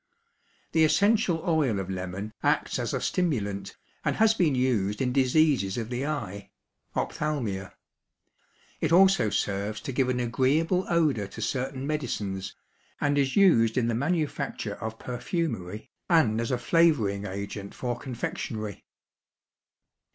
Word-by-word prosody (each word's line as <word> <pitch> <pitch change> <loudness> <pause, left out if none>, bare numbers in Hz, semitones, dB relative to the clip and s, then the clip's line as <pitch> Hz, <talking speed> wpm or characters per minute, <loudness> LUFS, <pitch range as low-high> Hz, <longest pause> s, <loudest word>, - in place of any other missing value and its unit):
The 160 - +4
essential 180 +1 +3
oil 150 -10 +2
of 95 - -4
lemon 95 +3 -5
acts - - +1
as - - -2
a - - -1
stimulant 105 - -1 0.3
and - - 0
has 220 0 +4
been 170 -10 +2
used 110 -6 +1
in 125 -2 0
diseases 135 -6 +3
of 115 0 -4
the 125 +3 -2
eye 105 -10 -4 0.5
(ophthalmia). 115 -11 -2 1.0
It 160 - 0
also 190 - +5
serves 100 +1 -1
to - - -4
give 130 0 +1
an 125 -1 0
agreeable 145 +9 +1
odor 150 - +2
to 95 - -11
certain 130 0 -2
medicines, 105 -10 -3 0.4
and 145 0 +1
is 140 -2 +1
used 120 - +5
in 120 -2 +2
the - - +1
manufacture 140 - -1
of 110 +1 -4
perfumery 120 - -4 0.2
and 120 -11 +4
as 115 - -2
a 125 - +1
flavoring 120 -11 +2
agent 100 +1 -6
for 125 -1 -2
confectionery. 115 -4 -5
125 Hz, 135 wpm, -27 LUFS, 105-155 Hz, 1.0 s, also